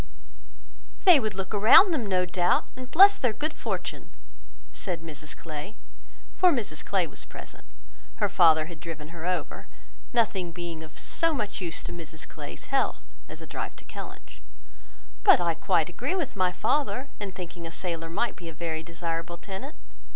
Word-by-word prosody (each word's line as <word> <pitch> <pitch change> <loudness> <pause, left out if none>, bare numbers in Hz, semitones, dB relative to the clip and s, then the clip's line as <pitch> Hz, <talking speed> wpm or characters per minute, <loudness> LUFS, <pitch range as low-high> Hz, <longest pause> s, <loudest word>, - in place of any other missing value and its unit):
"They 355 -6 +9
would 215 -5 -2
look 190 +1 -4
around 225 - +8
them, 245 -9 -1
no 185 -2 +2
doubt, 175 0 +1
and 255 0 -8
bless 395 +4 +8
their 245 -4 +2
good 305 +6 -2
fortune," - - -4 0.6
said 180 -4 -4
Mrs 155 -2 -8
Clay, 160 +6 -7 0.6
for 365 -1 +5
Mrs 210 - -2
Clay 190 -3 +1
was 160 - -5
present: - - -11 0.5
her - - +1
father 160 -3 +5
had 165 -1 -10
driven 160 -2 -7
her 170 0 -6
over, 180 0 -3 0.4
nothing 200 -7 +1
being 170 -1 -6
of 160 -1 -12
so 330 -2 +1
much 210 -6 -3
use 170 -2 -3
to - - -5
Mrs 165 -2 -7
Clay's 70 0 -9
health - - 0 0.2
as - - -9
a - - -7
drive - - -5
to - - -15
Kellynch: - - -10 0.8
"but - - +8
I 170 -1 +1
quite 165 -1 +1
agree 250 - -3
with 335 -11 -2
my 185 -2 +2
father 280 +5 0
in 205 -2 -4
thinking 175 -2 -7
a - - -8
sailor 165 -2 -3
might 220 +8 -1
be 170 -2 -8
a - - -9
very 160 -1 -3
desirable 165 0 -4
tenant. 215 - -7
180 Hz, 175 wpm, -27 LUFS, 165-220 Hz, 0.8 s, They